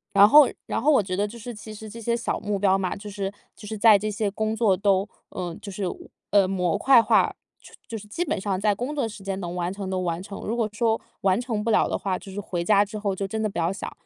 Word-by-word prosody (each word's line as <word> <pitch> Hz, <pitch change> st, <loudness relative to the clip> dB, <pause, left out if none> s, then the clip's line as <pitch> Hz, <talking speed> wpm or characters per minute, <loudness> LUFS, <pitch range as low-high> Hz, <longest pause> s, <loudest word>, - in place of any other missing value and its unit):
然 200 Hz, +1 st, +9 dB
后 295 Hz, 0 st, +8 dB, 0.2 s
然 -, -, -2 dB
后 300 Hz, +5 st, +4 dB
我 240 Hz, -, +4 dB
觉 185 Hz, -1 st, -5 dB
得 200 Hz, +3 st, 0 dB
就 230 Hz, +3 st, -10 dB
是 240 Hz, +2 st, -7 dB
其 215 Hz, 0 st, -9 dB
实 215 Hz, +1 st, -9 dB
这 230 Hz, +2 st, -9 dB
些 235 Hz, +1 st, 0 dB
小 235 Hz, -, -2 dB
目 205 Hz, -1 st, -2 dB
标 195 Hz, -1 st, +3 dB
嘛， 185 Hz, -2 st, -2 dB
就 205 Hz, +1 st, -8 dB
是 195 Hz, -1 st, -3 dB, 0.2 s
就 210 Hz, -, -12 dB
是 220 Hz, +1 st, -4 dB
在 215 Hz, -1 st, +7 dB
这 215 Hz, +2 st, -2 dB
些 210 Hz, 0 st, -1 dB
工 220 Hz, +2 st, -1 dB
作 215 Hz, -4 st, +3 dB
都 195 Hz, 0 st, +2 dB, 0.2 s
呃， 175 Hz, -2 st, -5 dB
就 205 Hz, -, -8 dB
是， 200 Hz, +1 st, -5 dB, 0.5 s
呃， 200 Hz, -2 st, +5 dB
模 180 Hz, -3 st, 0 dB
块 265 Hz, -3 st, +6 dB
化， -, -, +3 dB, 0.2 s
就 -, -, -16 dB
就 225 Hz, -, -6 dB
是 210 Hz, 0 st, -11 dB
基 330 Hz, +12 st, -2 dB
本 -, -, -2 dB
上 195 Hz, -1 st, -1 dB
在 205 Hz, +2 st, +2 dB
工 245 Hz, +8 st, -4 dB
作 280 Hz, -, 0 dB
时 210 Hz, -3 st, -8 dB
间 195 Hz, -1 st, -2 dB
能 175 Hz, -1 st, -4 dB
完 180 Hz, 0 st, -2 dB
成 195 Hz, -1 st, -5 dB
的 190 Hz, -1 st, -1 dB
完 175 Hz, -1 st, -2 dB
成， 200 Hz, 0 st, -8 dB
如 225 Hz, -, -1 dB
果 230 Hz, -3 st, 0 dB
说 225 Hz, +1 st, +1 dB, 0.2 s
完 190 Hz, +1 st, +3 dB
成 230 Hz, -4 st, -2 dB
不 225 Hz, -, -2 dB
了 220 Hz, -, +3 dB
的 -, -, -1 dB
话， 190 Hz, -2 st, -2 dB
就 195 Hz, -, -11 dB
是 195 Hz, -, -5 dB
回 175 Hz, -3 st, -3 dB
家 205 Hz, +2 st, +4 dB
之 215 Hz, +1 st, -7 dB
后 205 Hz, -2 st, -1 dB
就 195 Hz, +1 st, -3 dB
真 220 Hz, +3 st, -3 dB
的 215 Hz, -, +1 dB
不 195 Hz, -, -5 dB
要 170 Hz, +3 st, +1 dB
想， 195 Hz, -, -6 dB
205 Hz, 305 characters per minute, -25 LUFS, 190-220 Hz, 0.5 s, 然